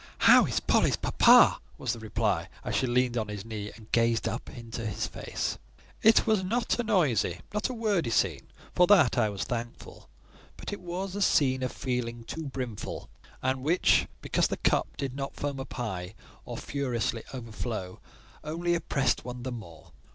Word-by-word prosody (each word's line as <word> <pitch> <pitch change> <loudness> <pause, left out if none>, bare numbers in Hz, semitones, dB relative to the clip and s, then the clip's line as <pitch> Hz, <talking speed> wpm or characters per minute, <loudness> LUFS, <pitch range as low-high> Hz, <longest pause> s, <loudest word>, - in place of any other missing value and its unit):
"How - - +8
is - - 0
Polly's - - +3
papa?" - - +6 0.2
was 125 -3 -2
the 115 - -7
reply, 105 -5 -1 0.2
as - - -2
she 130 - +1
leaned 125 0 +1
on 110 -2 -1
his 105 -1 -6
knee, 105 -2 -5
and 110 -2 -16
gazed 115 -1 +2
up - - -4
into 115 -1 -7
his 105 -3 -2
face. - - -4 0.4
It 220 +1 +6
was 215 -4 +2
not 230 +6 0
a - - +1
noisy, 135 - +1
not 210 +4 0
a 255 - -4
wordy 205 - 0
scene: 95 -9 0 0.3
for 180 - +5
that 175 - +6
I 110 -2 +3
was 100 -2 -3
thankful; 120 -1 -6 0.5
but - - -6
it 200 - -6
was 180 +2 -4
a 205 - -3
scene 130 -8 +3
of 130 - -1
feeling 120 -2 -3
too 160 +7 -6
brimful, 125 -5 -5 0.3
and 130 0 0
which, 165 +7 +3 0.2
because - - +2
the - - -3
cup - - 0
did 135 -2 -3
not 135 0 -5
foam 145 -1 -3
up 135 - -7
high 95 -5 -4 0.3
or - - -6
furiously 120 -5 -2
overflow, 115 -6 -5 0.4
only 170 +3 -1
oppressed 135 -6 0
one 125 0 -7
the 130 - -3
more. 85 -10 -10
125 Hz, 180 wpm, -28 LUFS, 110-160 Hz, 0.5 s, How